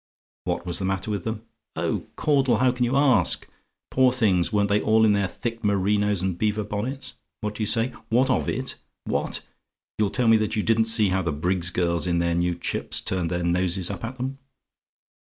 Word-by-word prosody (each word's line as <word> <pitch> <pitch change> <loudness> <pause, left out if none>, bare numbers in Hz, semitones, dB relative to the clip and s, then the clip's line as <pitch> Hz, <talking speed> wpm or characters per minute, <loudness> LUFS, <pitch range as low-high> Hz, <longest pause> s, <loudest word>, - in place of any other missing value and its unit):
"WHAT - - -2
WAS 90 -1 -2
THE 95 - -2
MATTER 95 +2 -2
WITH 100 - -3
THEM? 110 -1 -4 0.3
"Oh, - - -2
Caudle! 135 -6 +2
How 130 +2 +3
can 125 0 0
you 125 +3 0
ask? 130 - +3 0.4
Poor 130 -1 +4
things! 100 -9 +2
weren't 105 -1 +2
they 105 +1 +2
all 110 0 +4
in 105 - +4
their 100 -1 +1
thick 115 +4 -5
merinos 100 -1 +1
and 95 -2 -2
beaver 105 0 0
bonnets? 115 +7 -4 0.3
What 105 -1 -3
do 105 - -7
you 105 - 0
say? 115 +3 +2 0.2
"WHAT 125 +4 +3
OF - - 0
IT? 130 0 -3 0.3
"What! - - -2 0.6
you'll 105 -2 +2
tell 125 +2 0
me 115 0 +6
that 110 0 -1
you 105 - 0
didn't 115 0 +3
see 110 -3 +4
how 95 +1 +1
the 85 -3 -1
Briggs's 90 +4 0
girls, 85 -1 0
in 85 -1 +1
their 85 0 +1
new 85 0 0
chips, - - -2
turned 90 -3 -2
their 85 0 -2
noses 90 +1 +1
up 100 - -7
at 125 +3 -6
'em? 135 +2 -4
105 Hz, 205 wpm, -24 LUFS, 90-115 Hz, 0.6 s, me